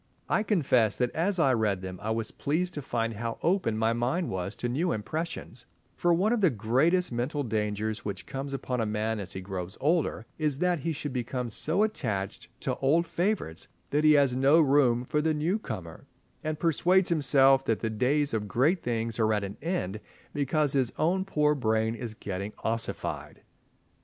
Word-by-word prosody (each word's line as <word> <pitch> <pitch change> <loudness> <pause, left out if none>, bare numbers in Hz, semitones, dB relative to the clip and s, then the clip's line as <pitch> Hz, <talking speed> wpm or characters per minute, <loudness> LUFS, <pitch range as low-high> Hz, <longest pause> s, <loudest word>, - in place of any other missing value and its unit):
I - - +2
confess 135 - +2
that 125 -1 0
as 185 +4 0
I 140 -6 +4
read 105 -5 +1
them 95 -1 -6
I 105 - -3
was 110 -1 -1
pleased 175 +5 -1
to 145 - -4
find 115 -3 -2
how 115 +2 -4
open 170 - +1
my 110 +1 +2
mind 125 +10 -1
was 95 +2 -3
to 120 - -3
new 150 +9 0
impressions, 120 +1 -4 0.3
for 175 - +2
one 190 +7 +3
of 235 - 0
the 185 - +5
greatest 135 - +2
mental 125 +5 -1
dangers 110 -1 -2
which 100 - -5
comes 140 0 -5
upon 130 -3 -2
a - - +1
man 110 +1 -1
as 95 -2 -5
he 95 - -5
grows 95 0 -6
older 155 -6 +1
is 150 -3 +1
that 180 +1 +1
he 165 +4 -2
should 145 -2 -4
become 125 -1 -3
so 165 - +1
attached 105 - -3
to - - -1
old 160 +6 +2
favourites 175 - -2 0.2
that 150 +2 +2
he 155 0 +7
has 140 -4 +4
no 135 +5 +5
room 135 -5 +4
for 150 +4 0
the 155 0 +1
new 170 +8 0
comer, 95 - -7 0.4
and 155 -1 -2
persuades 175 +3 +3
himself 135 -4 +4
that 115 - 0
the 110 - -1
days 140 +6 +1
of 105 -2 -1
great 150 - +2
things 115 -1 -2
are 110 -1 +3
at 105 -1 +1
an 100 +1 -5
end 135 - -2 0.3
because 145 0 +1
his 130 -4 +1
own 185 +4 +1
poor 150 -5 +2
brain 110 -4 +1
is 115 -2 -6
getting 100 0 -5
ossified. 115 0 -3
130 Hz, 190 wpm, -28 LUFS, 110-155 Hz, 0.4 s, he